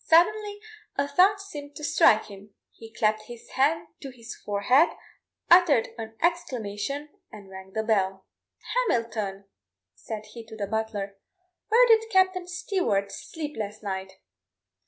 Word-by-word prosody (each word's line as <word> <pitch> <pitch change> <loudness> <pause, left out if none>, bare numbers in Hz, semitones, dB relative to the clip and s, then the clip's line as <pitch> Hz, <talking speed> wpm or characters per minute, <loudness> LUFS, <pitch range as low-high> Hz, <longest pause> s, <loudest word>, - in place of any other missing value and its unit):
Suddenly 410 +5 +3 0.4
a 280 0 0
thought 375 +8 +4
seemed 295 -8 -9
to 300 - -9
strike 220 -6 +4
him; 200 0 -13 0.2
he 225 -1 -13
clapt 215 -2 0
his 240 -1 -11
hand 290 +5 +1
to 275 - -7
his 240 -2 -10
forehead, 245 +10 +3 0.6
uttered 340 -9 +6
an 225 -1 -8
exclamation, 280 - -2 0.2
and 200 -2 -12
rang 190 0 -11
the 220 - -1
bell. 195 -3 0 0.6
"Hamilton," 215 - -2 0.5
said 210 - -7
he 230 - -8
to 220 - -10
the 205 - -2
butler; 205 -2 -3 0.5
"where 465 +3 +6
did 450 -1 +4
Captain 375 -3 +2
Stewart 360 - -1
sleep 300 -2 -7
last 210 0 -5
night?" 190 -1 -4
230 Hz, 135 wpm, -26 LUFS, 205-340 Hz, 0.6 s, uttered